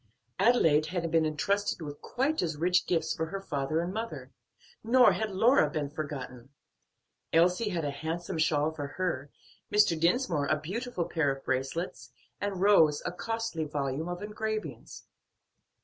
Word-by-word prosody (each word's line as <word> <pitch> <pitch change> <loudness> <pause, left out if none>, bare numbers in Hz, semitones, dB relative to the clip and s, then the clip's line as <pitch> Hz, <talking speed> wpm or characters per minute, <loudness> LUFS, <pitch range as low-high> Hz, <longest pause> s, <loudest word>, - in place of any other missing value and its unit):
Adelaide 165 -9 +4
had 170 -1 -2
been 165 -1 +3
intrusted 195 +8 0
with 145 -3 -7
quite 280 +5 0
as 160 -4 -2
rich 180 +3 +2
gifts 160 -2 +1
for 160 - -2
her 195 +5 -4
father 155 -3 -1
and 175 +2 -3
mother; 155 - -5 0.5
nor 245 +3 +6
had 220 -1 -2
Lora 205 - +4
been 145 -1 -3
forgotten; 135 -5 -6 0.8
Elsie 180 +6 +3
had 170 -5 -2
a 145 - -1
handsome 160 +3 -4
shawl 155 -1 +2
for 145 -3 -5
her, 155 -7 -2 0.4
Mr. 210 -5 +4
Dinsmore 170 - +1
a 155 +1 +1
beautiful 195 +3 -3
pair 160 -5 +1
of 135 0 -7
bracelets, 130 -2 -3 0.3
and 200 -2 -3
Rose 165 -7 +5
a - - -1
costly 225 -3 -3
volume 145 +1 -2
of 175 +3 -5
engravings. 215 +1 -5
165 Hz, 150 wpm, -29 LUFS, 150-200 Hz, 0.8 s, nor